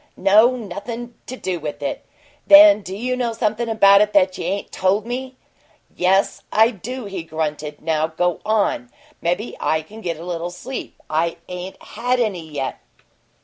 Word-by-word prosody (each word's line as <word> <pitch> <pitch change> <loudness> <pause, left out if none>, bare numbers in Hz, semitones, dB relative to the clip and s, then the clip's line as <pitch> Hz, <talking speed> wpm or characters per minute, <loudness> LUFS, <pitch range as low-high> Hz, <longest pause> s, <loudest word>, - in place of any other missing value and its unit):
"No. 220 +6 +5
Nothin' 235 +3 -6
to 255 - -5
do 185 -8 -3
with 145 -2 -6
it." 140 - -3 0.4
"Then 300 -5 +9
do 190 -1 -7
you 250 +5 -2
know 245 -2 -1
something 225 +1 -1
about 200 -2 +6
it 210 0 +1
that 185 -2 +4
you - - -5
ain't 195 +2 -3
told 195 +3 +1
me?" 255 +2 -5 0.6
"Yes, 190 +2 +2
I 225 +2 +5
do," 245 +4 -7
he 195 -3 -5
grunted. 155 -2 -4
"Now 160 -1 +1
go 175 +2 -1
on. 220 +5 0 0.3
Maybe 180 +7 -1
I 160 0 0
can 215 +8 -12
get 170 -5 -3
a 170 - -8
little 175 -1 -3
sleep. 240 +9 -7
I 165 +2 0
ain't 180 +1 -7
had 245 +3 -1
any 185 -9 -2
yet!" 140 -3 -4
200 Hz, 170 wpm, -21 LUFS, 170-235 Hz, 0.6 s, Then